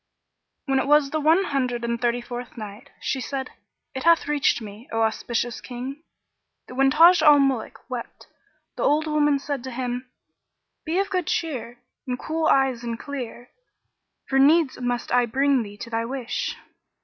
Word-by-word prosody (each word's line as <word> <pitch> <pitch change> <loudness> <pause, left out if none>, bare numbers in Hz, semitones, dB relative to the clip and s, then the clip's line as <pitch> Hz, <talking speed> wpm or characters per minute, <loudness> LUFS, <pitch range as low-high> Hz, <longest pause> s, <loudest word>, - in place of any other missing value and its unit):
When 270 -2 +2
it - - -1
was 295 -1 +4
the 310 - 0
One 320 +5 +4
Hundred 250 -6 -1
and 235 0 -2
Thirty 240 0 +1
fourth 240 0 -8
Night, 215 +4 -9
She 265 - -2
said, 265 +1 -4 0.4
It 265 - -4
hath 335 0 +4
reached 295 -4 +2
me, 215 +2 -10
O 225 0 +1
auspicious 235 +2 -1
King, 260 +4 -7 0.7
that - - -10
when 270 +1 +3
Taj 335 +4 +7
al 300 -2 +7
Muluk 270 -5 0
wept - - -7 0.5
the - - -4
old 300 +2 +3
woman 295 -2 +2
said 275 -2 -4
to - - -4
him, 250 0 -4 0.8
"Be 330 +2 -1
of 395 +1 0
good 365 -4 -1
cheer 245 -7 -2 0.3
and 250 -1 -2
cool 320 +3 -1
eyes 265 -3 +2
and 230 -1 -3
clear; 250 -4 -7 0.8
for 270 - +2
needs 290 -2 +4
must 245 -1 -2
I 245 -1 +3
bring 270 +2 +2
thee 205 -2 -8
to 230 - -8
thy 225 0 0
wish." 250 -1 -3
265 Hz, 175 wpm, -24 LUFS, 240-295 Hz, 0.8 s, Taj